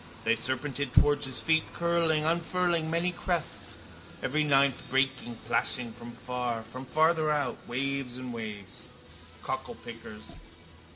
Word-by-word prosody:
They -, -, +4 dB
serpented 130 Hz, +3 st, -1 dB
towards 145 Hz, -1 st, +5 dB
his 130 Hz, -, -2 dB
feet, 160 Hz, 0 st, +4 dB
curling, 170 Hz, -2 st, +2 dB
unfurling 170 Hz, 0 st, +1 dB
many 170 Hz, +2 st, +1 dB
crests, 175 Hz, -2 st, -2 dB, 0.5 s
every 150 Hz, +3 st, +2 dB
ninth, 140 Hz, -3 st, +4 dB
breaking, 130 Hz, -2 st, +1 dB
plashing, 120 Hz, +1 st, 0 dB
from 120 Hz, +1 st, -9 dB
far, 125 Hz, -2 st, -3 dB
from 130 Hz, +4 st, -8 dB
farther 155 Hz, +3 st, +3 dB
out, 145 Hz, -4 st, +1 dB
waves 135 Hz, 0 st, -1 dB
and 130 Hz, -1 st, -5 dB
waves. 105 Hz, -4 st, -7 dB, 0.6 s
Cocklepickers. 110 Hz, -6 st, -6 dB
135 Hz, 120 wpm, -30 LUFS, 120-160 Hz, 0.6 s, towards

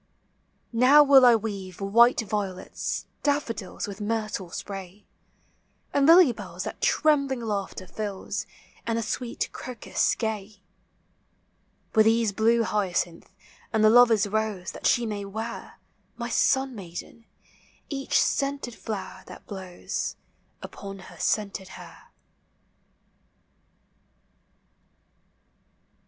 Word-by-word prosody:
Now 260 Hz, +6 st, +7 dB
will 270 Hz, -3 st, +8 dB
T 235 Hz, -, +6 dB
weave 200 Hz, -5 st, -5 dB
while 230 Hz, +5 st, +5 dB
violets, 200 Hz, -5 st, -3 dB, 0.2 s
daffodils 285 Hz, -11 st, -2 dB
With 200 Hz, 0 st, -8 dB
myrtle 215 Hz, -4 st, -2 dB
spray, 195 Hz, +2 st, -8 dB, 0.9 s
And 280 Hz, 0 st, +3 dB
lily 335 Hz, -4 st, +8 dB
bells 235 Hz, -, -7 dB
that -, -, -7 dB
trembling 280 Hz, -5 st, +2 dB
laughter 200 Hz, -4 st, -3 dB
Alls, 205 Hz, -3 st, -4 dB, 0.4 s
And 230 Hz, 0 st, 0 dB
the 230 Hz, -, -1 dB
sweet 240 Hz, +2 st, -3 dB
crocus 250 Hz, -3 st, -1 dB
gay: 215 Hz, -3 st, -4 dB, 1.3 s
With 220 Hz, 0 st, +5 dB
these 225 Hz, -1 st, +3 dB
blue 230 Hz, +3 st, +3 dB
hyacinth, 185 Hz, -4 st, -1 dB, 0.4 s
and 220 Hz, -1 st, +2 dB
the 215 Hz, -, +7 dB
lover's 235 Hz, -3 st, +6 dB
rose 205 Hz, -3 st, -2 dB
That -, -, -2 dB
she 240 Hz, -, +3 dB
may 210 Hz, -2 st, -3 dB
wear 220 Hz, +4 st, -6 dB, 0.4 s
My -, -, -4 dB
sun 265 Hz, -1 st, +2 dB
maiden 200 Hz, +3 st, -9 dB, 0.6 s
each 275 Hz, -2 st, -3 dB
sceuted 275 Hz, -5 st, -1 dB
(lower 210 Hz, -3 st, -4 dB
that -, -, -12 dB
blows, 190 Hz, -3 st, -5 dB, 0.5 s
Upon 195 Hz, -1 st, -8 dB
her 190 Hz, -, -13 dB
scented 200 Hz, -2 st, -1 dB
hair. -, -, -13 dB
220 Hz, 105 wpm, -26 LUFS, 195-240 Hz, 1.3 s, will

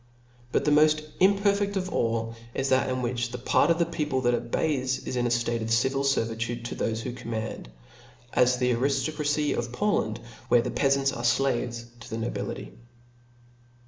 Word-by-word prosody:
But -, -, +1 dB
the 150 Hz, -, +3 dB
moft 155 Hz, +1 st, +4 dB, 0.2 s
imperfeA 200 Hz, +1 st, +3 dB
of 185 Hz, -1 st, -1 dB
all, 115 Hz, 0 st, 0 dB, 0.2 s
is 135 Hz, 0 st, 0 dB
that 130 Hz, 0 st, +3 dB
in 130 Hz, 0 st, -2 dB
which 120 Hz, 0 st, -1 dB
the 125 Hz, -, -5 dB
part 130 Hz, +4 st, +2 dB
of 170 Hz, -, +4 dB
the 170 Hz, -, +2 dB
people 150 Hz, -5 st, -1 dB
that 120 Hz, -1 st, +2 dB
obeys, 130 Hz, +3 st, -1 dB
is -, -, -3 dB
in 120 Hz, -1 st, +1 dB
a -, -, 0 dB
ftate 120 Hz, -1 st, 0 dB
of 110 Hz, -, -3 dB
civil 130 Hz, +4 st, +2 dB
fervitudc 115 Hz, -3 st, -1 dB
to 120 Hz, -, -5 dB
thofe 115 Hz, 0 st, -1 dB
who 120 Hz, +2 st, -4 dB
command, 110 Hz, -, -5 dB, 0.6 s
as 125 Hz, 0 st, +4 dB
the 125 Hz, 0 st, +2 dB
ariftocracy 145 Hz, +4 st, 0 dB
of 120 Hz, 0 st, -3 dB
Poland, 125 Hz, -, 0 dB, 0.3 s
where 120 Hz, -1 st, +4 dB
the 125 Hz, -, -3 dB
peafants 135 Hz, +2 st, +2 dB
are 120 Hz, -, -5 dB
flaves 120 Hz, -1 st, +1 dB
to 115 Hz, -, -11 dB
the 110 Hz, -, -4 dB
nobility. 115 Hz, +1 st, -4 dB
125 Hz, 175 wpm, -27 LUFS, 120-145 Hz, 0.6 s, moft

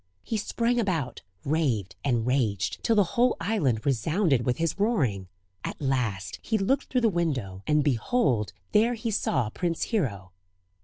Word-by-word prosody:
He -, -, -3 dB
sprang 235 Hz, +3 st, 0 dB
about, 165 Hz, -, -1 dB, 0.2 s
raved, 130 Hz, -, 0 dB
and 120 Hz, -5 st, +1 dB
raged, 115 Hz, -6 st, 0 dB
till 230 Hz, -, +3 dB
the 205 Hz, -, +6 dB
whole 240 Hz, +7 st, +1 dB
island 160 Hz, -, 0 dB
resounded 140 Hz, -, +1 dB
with 125 Hz, 0 st, +1 dB
his 165 Hz, +3 st, -1 dB
roaring. 130 Hz, -, +1 dB, 0.4 s
At -, -, -5 dB
last 115 Hz, -9 st, -1 dB
he 220 Hz, -, 0 dB
looked 260 Hz, +8 st, +1 dB
through 255 Hz, -, 0 dB
the 230 Hz, -, +4 dB
window, 135 Hz, -, -1 dB
and 150 Hz, -1 st, +3 dB
behold 125 Hz, -, +1 dB, 0.2 s
there 230 Hz, +3 st, +3 dB
he 230 Hz, 0 st, -3 dB
saw 120 Hz, -, 0 dB
Prince 170 Hz, +2 st, -1 dB
Hero. 100 Hz, -, -1 dB
150 Hz, 155 wpm, -27 LUFS, -, 0.4 s, the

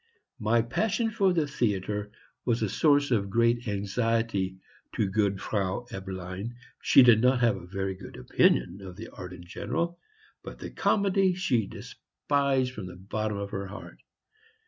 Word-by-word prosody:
My 115 Hz, +1 st, +3 dB
passion 220 Hz, -, 0 dB
for 200 Hz, -3 st, +3 dB
the 165 Hz, -4 st, +2 dB
theatre 105 Hz, -5 st, -1 dB, 0.3 s
was 115 Hz, -2 st, +1 dB
a 105 Hz, -, 0 dB
source 145 Hz, -, +3 dB
of 100 Hz, -4 st, +1 dB
great 115 Hz, +3 st, +2 dB
anxiety 100 Hz, -1 st, 0 dB, 0.4 s
to 110 Hz, -, +2 dB
good 100 Hz, -1 st, +1 dB
Frau 100 Hz, +4 st, -2 dB
Eberlein. 95 Hz, +3 st, -6 dB, 0.3 s
She 135 Hz, -, +7 dB
did 115 Hz, -3 st, +6 dB
not 125 Hz, +1 st, +4 dB
have 115 Hz, -3 st, +4 dB
a 90 Hz, -2 st, -9 dB
very 95 Hz, +1 st, -2 dB
good 95 Hz, -, -11 dB
opinion 85 Hz, +8 st, +2 dB
of 95 Hz, -2 st, -9 dB
the 110 Hz, +4 st, -8 dB
art 90 Hz, -1 st, -9 dB
in 90 Hz, -1 st, -10 dB
general, 170 Hz, -, -3 dB, 0.4 s
but -, -, -8 dB
the -, -, -7 dB
comedy 195 Hz, -2 st, +2 dB
she 125 Hz, -, +1 dB
despised 135 Hz, -3 st, -1 dB
from 105 Hz, -6 st, -6 dB
the 90 Hz, -, -9 dB
bottom 105 Hz, +3 st, -3 dB
of 100 Hz, 0 st, -4 dB
her 100 Hz, 0 st, -4 dB
heart. 100 Hz, -, -10 dB
110 Hz, 160 wpm, -28 LUFS, 95-125 Hz, 0.4 s, She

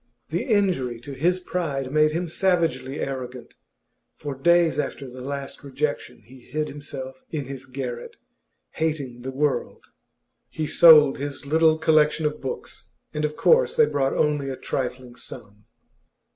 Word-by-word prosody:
The -, -, -2 dB
injury 185 Hz, -, +1 dB
to 140 Hz, -, -9 dB
his 175 Hz, +7 st, +1 dB
pride 145 Hz, -8 st, -3 dB
made 155 Hz, +1 st, +4 dB
him 170 Hz, +3 st, -2 dB
savagely 165 Hz, -5 st, 0 dB
arrogant; 130 Hz, -2 st, -5 dB, 0.6 s
for 145 Hz, -1 st, -5 dB
days 170 Hz, +5 st, +3 dB
after 140 Hz, -1 st, -3 dB
the 125 Hz, 0 st, -10 dB
last 140 Hz, +1 st, -6 dB
rejection 140 Hz, -2 st, -3 dB
he 130 Hz, +2 st, -15 dB
hid 150 Hz, +5 st, -3 dB
himself 135 Hz, -2 st, -8 dB
in 150 Hz, -4 st, -3 dB
his 135 Hz, 0 st, -8 dB
garret, 125 Hz, -2 st, -6 dB, 0.5 s
hating 145 Hz, -6 st, -3 dB
the 130 Hz, -, -5 dB
world. 140 Hz, +1 st, -1 dB, 0.6 s
He 155 Hz, -, -3 dB
sold 150 Hz, -3 st, +7 dB
his 140 Hz, 0 st, -5 dB
little 160 Hz, +2 st, +4 dB
collection 155 Hz, 0 st, +3 dB
of 150 Hz, 0 st, -2 dB
books, 135 Hz, -, -6 dB, 0.2 s
and 150 Hz, -, -2 dB
of 150 Hz, 0 st, -1 dB
course 475 Hz, -, +4 dB
they 465 Hz, -1 st, +6 dB
brought 135 Hz, -, 0 dB
only 145 Hz, -2 st, +1 dB
a 130 Hz, -, -4 dB
trifling 125 Hz, -1 st, -4 dB
sum. 105 Hz, -2 st, -12 dB
145 Hz, 145 wpm, -24 LUFS, 130-160 Hz, 0.6 s, sold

